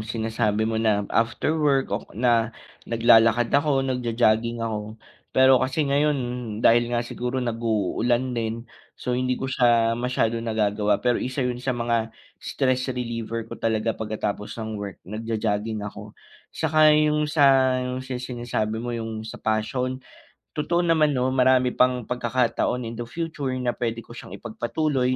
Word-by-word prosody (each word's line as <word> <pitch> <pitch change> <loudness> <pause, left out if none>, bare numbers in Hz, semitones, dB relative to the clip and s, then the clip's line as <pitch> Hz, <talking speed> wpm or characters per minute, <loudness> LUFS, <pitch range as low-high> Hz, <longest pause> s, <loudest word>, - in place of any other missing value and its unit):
sinasabi 110 -1 -1
mo 110 0 -1
na 105 -2 +2
after 115 +6 +1
work 140 -3 +2
o - - -3
na 115 -2 +3 0.4
naglalakad 115 0 +4
ako 140 -1 +2
nagjo-jogging 115 -2 +1
ako. 110 -1 -4 0.3
Pero 130 -1 +5
kasi 130 +4 0
ngayon 145 +1 +2 0.5
dahil 120 +1 +5
nga 120 0 -1
siguro 125 +2 -4
nagu-ulan 120 +1 0
din 115 0 -3 0.3
so 125 - -3
hindi 130 0 0
ko 130 - -2
siya 120 -3 +3
masyadong 115 -2 -1
nagagawa 105 -2 +1
pero 125 -1 +2
isa 130 +2 -3
yun 125 -1 -1
sa 125 +1 -2
mga 115 -2 -1 0.2
stress 130 -1 -1
reliever 115 -2 -4
ko - - -7
talaga 110 0 -1
pagkatapos 105 -1 -3
ng 110 -1 -4
work 100 -2 -7
nagjo-jogging 110 0 -2
ako 105 0 -8 0.4
saka 155 -1 +4
yung 150 0 +3
sa 135 -4 +4
yung 125 0 -4
sa 130 -1 -5
sinasabi 120 -3 -3
mo 120 +2 -4
yung 110 -1 -4
sa 110 - -9
passion 125 +4 -1 0.6
totoo 170 +3 0
naman 155 -4 +3
no 130 +1 +1
marami 130 -1 +3
pang 125 -1 +2
pagkakataon 125 +1 0
in 115 0 -6
the 120 - -4
future 145 -3 -3
na 125 -1 -1
pwede 115 -1 -3
ko - - -16
siyang 120 - -9
ipagpatuloy 130 +3 -1
120 Hz, 150 wpm, -24 LUFS, 115-130 Hz, 0.6 s, Pero